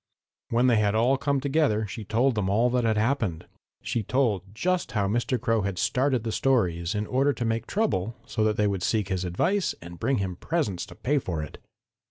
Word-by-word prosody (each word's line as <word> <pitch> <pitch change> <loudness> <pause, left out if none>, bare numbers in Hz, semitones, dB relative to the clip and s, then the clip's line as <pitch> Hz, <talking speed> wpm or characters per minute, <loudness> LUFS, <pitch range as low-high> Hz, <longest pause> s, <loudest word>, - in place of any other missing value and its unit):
"When 120 +2 +2
they 120 -3 +4
had 105 0 +2
all 120 +5 +3
come 140 +1 0
together 135 -6 +1
she 105 +2 -7
told 115 +6 +2
them 105 -4 -1
all 115 +5 +3
that 125 -1 +1
had 110 -1 +2
happened. 110 - 0 0.4
She 115 - -1
told 115 -3 +1
just 180 - -1
how 100 -3 +1
Mr. 120 +5 0
Crow 115 -2 +1
had 100 -2 -3
started 130 +4 +1
the 115 - -2
stories 90 -10 +1
in 105 0 -1
order 135 +5 +2
to 120 - -3
make 115 0 -1
trouble 115 - 0
so 110 - -1
that 105 0 +1
they 105 - +2
would 100 -2 -1
seek 105 +1 0
his 95 -1 -1
advice 180 - 0
and 85 0 -11
bring 130 +3 +1
him 95 -3 -3
presents 150 - -2
to 90 - -12
pay 140 +10 +1
for 85 -10 -3
it. 75 - -9
110 Hz, 215 wpm, -26 LUFS, 100-130 Hz, 0.4 s, they